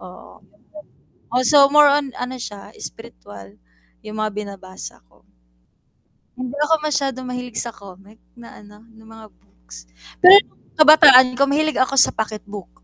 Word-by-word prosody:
oo, 180 0 -16 0.9
oh, 255 - 0
so, 280 +1 +4
more 295 0 +4
on 290 -1 -1
ano 255 +1 -7
siya, 205 -4 -10
spiritual 95 +13 -13 0.5
yung 215 0 -11
mga 215 0 -4
binabasa 195 - -11
ko, - - -28 1.1
hindi 255 +2 -8
ako 320 0 0
masyadong 275 -4 -4
mahilig 250 -2 -6
sa 240 - -6
comic 200 0 -17 0.2
na 240 -1 -16
ano 210 +1 -19
na 225 0 -21
mga 225 0 -15
books, - - -18 0.3
pero 380 +3 +7
nung - - -35
kabataan 270 -5 +6
ko 280 - +2
mahilig 310 +2 -2
ako 260 +2 -1
sa - - +5
pocket 215 -1 -6
book. 200 -3 -10
240 Hz, 150 wpm, -18 LUFS, 205-275 Hz, 1.1 s, pero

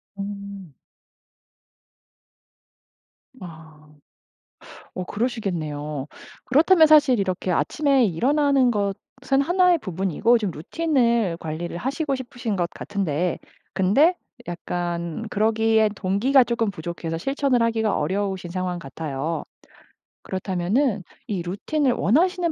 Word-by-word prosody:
음. 200 -4 -7 2.7
아. 160 -3 -12 1.1
어 185 - -4
그러시겠네요. 155 - -3 0.4
그렇다면 315 +5 +5
사실 295 -6 +5
이렇게 185 -1 -1
아침에 275 - +2
일어나는 270 - +2
것은 230 +6 -1
하나의 355 +3 +3
부분이고 195 - +1
좀 210 -5 -2
루틴을 235 - 0
관리를 170 +2 -5
하시고 275 - -2
싶으신 245 -4 -4
것 175 -2 -1
같은데 180 -4 -2 0.4
근데 270 - +4 0.3
약간 175 +3 -4
그러기엔 220 0 +2
동기가 210 +9 +3
조금 230 -3 0
부족해서 165 -1 -5
실천을 270 - 0
하기가 225 -2 +1
어려우신 190 +2 -2
상황 180 -1 -3
같아요. 150 +1 -4 0.8
그렇다면은 190 +5 -1 0.2
이 200 -6 -2
루틴을 255 - 0
원하시는 340 - +2
200 Hz, 255 characters per minute, -23 LUFS, 175-260 Hz, 2.7 s, 그렇다면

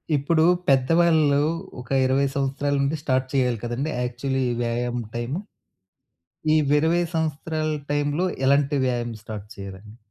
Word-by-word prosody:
ఇప్పుడు 155 +3 +2 0.2
పెద్దవాళ్ళు 150 +2 +4 0.4
ఒక 125 - -14 0.2
20 135 +2 +2
సంవత్సరాల 140 +1 -1
నుండి 140 +3 0
స్టార్ట్ 130 -3 0
చేయాలి 125 -4 +1
కదండీ! 125 +6 -2
యాక్చువలి 130 +2 -2 0.2
వ్యాయామం 120 0 -1
టైము. 120 +9 -2 1.2
ఈ - - +5 0.2
20 160 +4 +3
సంవత్సరాల 155 0 -1 0.2
టైములో 145 +5 0 0.2
ఎలాంటి 140 +1 +3
వ్యాయామం 120 -2 -2
స్టార్ట్ 105 -2 -7
చేయాలండి? 100 +2 -9
135 Hz, 120 wpm, -24 LUFS, 120-150 Hz, 1.2 s, ఈ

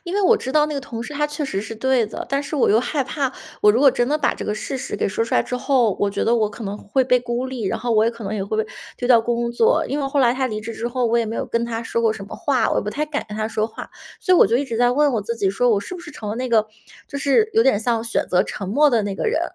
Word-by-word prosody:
因 350 +2 -4
为 410 - +2
我 440 +4 +5
知 260 - -5
道 300 -1 +4
那 300 - -4
个 280 - -2
同 230 -3 -6
事 290 - -8
他 295 +1 +1
确 295 0 -5
实 195 -9 -2
是 225 +1 -7
对 255 0 +1
的， - - -6
但 275 +1 0
是 295 - -6
我 280 - +2
又 215 - +5
害 275 +3 -1
怕。 265 +1 -2 0.3
我 210 0 +7
如 240 - +1
果 280 -2 +7
真 240 0 0
的 300 +3 0
把 290 - +1
这 - - -6
个 210 - -2
事 270 +5 -4
实 250 - -5
给 - - 0
说 225 +3 -1
出 - - -3
来 - - +4
之 250 - -4
后， 250 -6 +2
我 200 -1 +1
觉 - - -2
得 235 - +3
我 215 -2 +1
可 220 +3 -10
能 200 0 -4
会 210 +6 0
被 250 0 +3
孤 240 +1 -3
立， 255 -4 -5
然 - - -1
后 245 - -3
我 215 0 +4
也 230 - +2
可 230 -1 -11
能 210 - -3
也 195 -2 -2
会 215 +2 -1
被 215 - -11 0.3
丢 245 - -2
掉 240 -2 +7
工 235 +1 -1
作。 450 - +2
因 290 - -2
为 275 - -1
后 275 +1 0
来 245 -1 +4
他 260 0 0
离 215 -3 -4
职 230 +1 -6
之 230 - -4
后， 245 -1 0
我 235 +1 +2
也 230 - +2
没 220 +1 -4
有 - - -3
跟 230 0 -1
他 230 -1 -4
说 230 0 -2
过 225 -1 +3
什 195 -2 -8
么 - - -8
话， 275 -3 +1
我 - - 0
也 - - +1
不 210 - -2
太 300 +5 -2
敢 295 -5 -3
跟 210 - -6
他 215 0 -2
说 215 0 -1
话。 225 - -9 0.3
所 370 - +3
以 - - +5
我 - - +7
就 235 - +2
一 280 - 0
直 235 -4 -4
在 245 +1 +3
问 290 +2 +3
我 215 -4 -1
自 235 +3 -3
己， 200 -4 +1
说 240 +5 +2
我 205 -2 +2
是 365 - -7
不 360 - -8
是 325 - -10
成 220 -8 -7
了 210 - -3
那 255 +1 -3
个 220 -2 +3 0.4
就 280 - -5
是 285 +11 +3
有 450 - +5
点 215 -6 +3
像 230 -1 0
选 230 - -1
择 180 0 +3
沉 195 -2 -6
默 290 +7 +4
的 230 -3 +2
那 200 -1 -3
个 - - -4
人？ 450 - +1
240 Hz, 375 characters per minute, -21 LUFS, 220-275 Hz, 0.4 s, 我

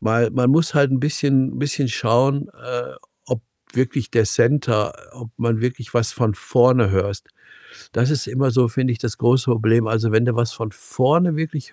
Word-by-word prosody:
Weil 115 0 +1
man 125 0 +2
muss 160 +2 +2
halt 140 -2 +3
'n 135 - +1
bisschen 135 -2 0
bisschen 145 -1 -1
schauen, 130 +6 +1
äh, 120 - -6 0.3
ob - - -3 0.3
wirklich 130 -2 -2
der 115 -2 +3
Center 115 -1 +1 0.2
ob 120 -2 -11
man 115 -1 -1
wirklich 125 -1 -4
was 115 -2 +1
von 110 -4 0
vorne 120 +1 +3
hörst. 100 +1 -2 0.6
Das 120 +2 0
ist 145 -6 -1
immer 130 0 0
so, 125 -1 +3
finde 130 +2 -1
ich, 115 - -4
das 115 -3 -4
große 125 +2 +2
Problem. 115 0 +2
Also, 110 0 0
wenn 110 +2 +3
du 125 -1 0
was 120 0 0
von 115 -3 -6
vorne 155 - +1
wirklich 155 -3 -5
120 Hz, 185 wpm, -20 LUFS, 115-135 Hz, 0.6 s, halt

